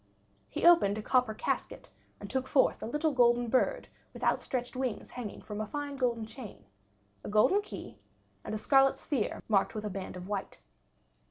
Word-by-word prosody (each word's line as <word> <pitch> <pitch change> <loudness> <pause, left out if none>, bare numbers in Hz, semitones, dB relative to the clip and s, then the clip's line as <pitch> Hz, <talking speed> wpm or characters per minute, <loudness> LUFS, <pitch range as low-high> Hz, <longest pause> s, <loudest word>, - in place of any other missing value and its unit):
He - - -2
opened 335 -13 +6
a 215 - -5
copper 250 -3 +2
casket - - -3 0.3
and - - -7
took 260 -1 -2
forth 265 -1 +3
a - - -4
little 300 +6 0
golden 240 -2 +3
bird 265 - +1 0.3
with - - -9
outstretched 250 0 -1
wings 255 -3 -3
hanging 235 -5 -7
from 210 0 -5
a 215 - -3
fine 290 +3 -4
golden 240 -4 0
chain, 220 - -10 0.6
a - - -6
golden 215 - +4
key, 410 - -9 0.4
and - - -4
a - - -1
scarlet 270 +5 +4
sphere 260 -8 -2
marked 205 0 +2
with 215 0 -4
a 210 - -3
band 190 0 -6
of 180 0 -8
white. 200 -1 -4
240 Hz, 180 wpm, -31 LUFS, 215-270 Hz, 0.6 s, opened